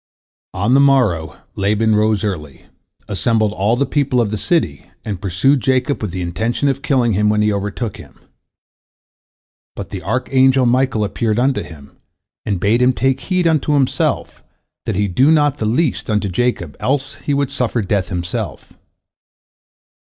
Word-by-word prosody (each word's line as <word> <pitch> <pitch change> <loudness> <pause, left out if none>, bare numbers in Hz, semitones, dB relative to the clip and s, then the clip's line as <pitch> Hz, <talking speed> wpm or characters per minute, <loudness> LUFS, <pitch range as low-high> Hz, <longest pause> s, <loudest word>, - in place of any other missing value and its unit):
On 100 +7 +1
the 135 - +6
morrow 125 - +2 0.2
Laban 105 +2 +1
rose 105 0 +1
early, 75 -9 -5 0.4
assembled 110 +1 0
all 105 +3 +1
the 140 +3 +1
people 140 -4 0
of 110 -4 0
the - - -1
city, 85 - -1 0.2
and 100 -4 -4
pursued 100 +9 +2
Jacob 130 +2 0
with 105 - -2
the 90 +1 -4
intention 110 +10 -1
of 135 0 -2
killing 125 -5 +1
him 105 +1 +2
when 105 0 +2
he 105 0 +2
overtook 105 +2 -4
him. 75 -6 -15 1.6
But - - -7
the - - -5
archangel 130 0 +2
Michael 125 -2 +1
appeared 110 +1 -1
unto 130 +2 +1
him, 70 -4 -12 0.5
and 100 -4 -1
bade 110 +6 +2
him 125 +1 +4
take 130 +4 0
heed 185 -2 -1
unto 155 -2 +2
himself, 135 -3 0 0.4
that - - -1
he 100 +1 +1
do 130 - +3
not 145 -3 +3
the 110 - -1
least 130 +4 0
unto 105 -2 0
Jacob, 90 - -1
else 135 0 -1
would 140 -2 +1
he - - -8
suffer 120 -2 -1
death 95 -2 -1
himself. 90 -1 -5
115 Hz, 160 wpm, -18 LUFS, 100-135 Hz, 1.6 s, the